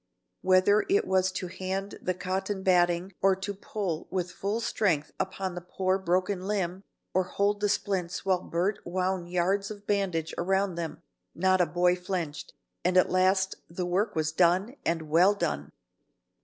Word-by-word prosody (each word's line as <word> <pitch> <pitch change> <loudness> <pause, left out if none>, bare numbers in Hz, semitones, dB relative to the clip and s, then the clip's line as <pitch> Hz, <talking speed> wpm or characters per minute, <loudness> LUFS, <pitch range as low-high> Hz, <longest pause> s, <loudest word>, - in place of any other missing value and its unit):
Whether 190 +3 +4
it 400 +2 +3
was 190 0 +2
to 185 - -3
hand 190 +2 -4
the 185 - -1
cotton 190 +2 -3
batting 175 0 +2
or 195 -1 +4
to 195 +2 -4
pull 195 -4 -4
with 180 -2 -2
full 200 +5 -2
strength 180 -10 0
upon 190 -1 -2
the 175 - -6
poor 185 +2 0
broken 185 +1 0
limb, 190 -2 -1 0.3
or 185 0 +2
hold 205 +2 0
the 205 - +2
splints 195 -3 -1
while 185 -2 +2
Bert 190 +6 -1
wound 185 0 -2
yards 190 +3 +1
of 205 -1 -9
bandage 185 -6 0
around 190 +2 +1
them, 170 -1 -5 0.3
not 185 +1 +3
a 175 - +3
boy 180 0 +3
flinched, 180 -5 -4 0.3
and 180 +1 +2
at 185 - +4
last 190 +1 +2
the 175 +2 -3
work 185 +4 0
was 155 -1 0
done, 185 - +2
and 165 -1 0
well 175 +6 +5
done. 75 - -2
185 Hz, 165 wpm, -28 LUFS, 175-195 Hz, 0.3 s, well